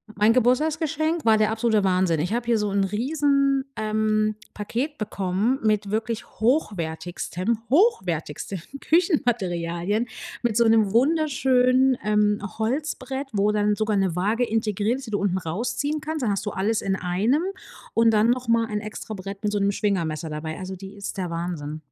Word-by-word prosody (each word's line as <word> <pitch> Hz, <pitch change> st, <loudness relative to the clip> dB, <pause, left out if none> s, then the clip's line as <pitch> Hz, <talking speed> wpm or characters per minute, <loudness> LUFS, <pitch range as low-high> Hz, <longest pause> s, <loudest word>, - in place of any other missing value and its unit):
Mein 210 Hz, +2 st, +4 dB
Geburtstagsgeschenk 310 Hz, +6 st, +1 dB
war 220 Hz, -1 st, +5 dB
der 215 Hz, 0 st, +2 dB
absolute 220 Hz, -2 st, +1 dB
Wahnsinn. 180 Hz, -3 st, +2 dB
Ich 180 Hz, +7 st, -1 dB
habe 240 Hz, 0 st, -1 dB
hier 235 Hz, -1 st, +2 dB
so 210 Hz, -1 st, -1 dB
'n 200 Hz, 0 st, +2 dB
riesen, 275 Hz, +5 st, +1 dB
ähm, 215 Hz, 0 st, +1 dB, 0.2 s
Paket 245 Hz, +8 st, -3 dB
bekommen 205 Hz, +4 st, -1 dB
mit 210 Hz, -2 st, +1 dB
wirklich 225 Hz, +1 st, -2 dB, 0.2 s
hochwertigstem, 185 Hz, -, -1 dB
hochwertigsten 190 Hz, -, +1 dB, 0.2 s
Küchenmaterialien, 210 Hz, -, +1 dB, 0.4 s
mit 230 Hz, -3 st, +1 dB
so 235 Hz, -, +4 dB
'nem 220 Hz, -3 st, +4 dB
wunderschönen, 265 Hz, -2 st, +3 dB
ähm, 210 Hz, 0 st, +2 dB, 0.2 s
Holzbrett, 270 Hz, +2 st, -2 dB
wo 205 Hz, 0 st, +2 dB
dann 210 Hz, 0 st, +2 dB
sogar 215 Hz, 0 st, 0 dB
'ne 190 Hz, -3 st, +1 dB
Waage 215 Hz, +6 st, +1 dB
integriert 220 Hz, +1 st, 0 dB
ist, 270 Hz, -, -10 dB
die -, -, -7 dB
du 205 Hz, -, 0 dB
unten 190 Hz, -2 st, 0 dB
rausziehen 240 Hz, -, -2 dB
kannst. 310 Hz, -3 st, -3 dB
Dann 210 Hz, -, +1 dB
hast 195 Hz, -, -2 dB
du 205 Hz, -, -2 dB
alles 215 Hz, +3 st, 0 dB
in 190 Hz, -1 st, -1 dB
einem. 205 Hz, -, +1 dB, 0.5 s
Und 230 Hz, 0 st, +4 dB
dann 220 Hz, +1 st, +3 dB
noch 250 Hz, -1 st, -2 dB
mal 230 Hz, 0 st, +3 dB
ein 210 Hz, -1 st, -3 dB
Extrabrett 200 Hz, -2 st, -7 dB
mit 210 Hz, 0 st, 0 dB
so 205 Hz, -, +1 dB
'nem 200 Hz, 0 st, +2 dB
Schwingermesser 170 Hz, -6 st, -1 dB
dabei. 155 Hz, +2 st, -5 dB
Also, 185 Hz, 0 st, -5 dB
die 195 Hz, +2 st, -10 dB
ist 200 Hz, 0 st, -6 dB
der 185 Hz, -2 st, -2 dB
Wahnsinn. 165 Hz, -3 st, -4 dB
215 Hz, 165 wpm, -24 LUFS, 195-245 Hz, 0.5 s, war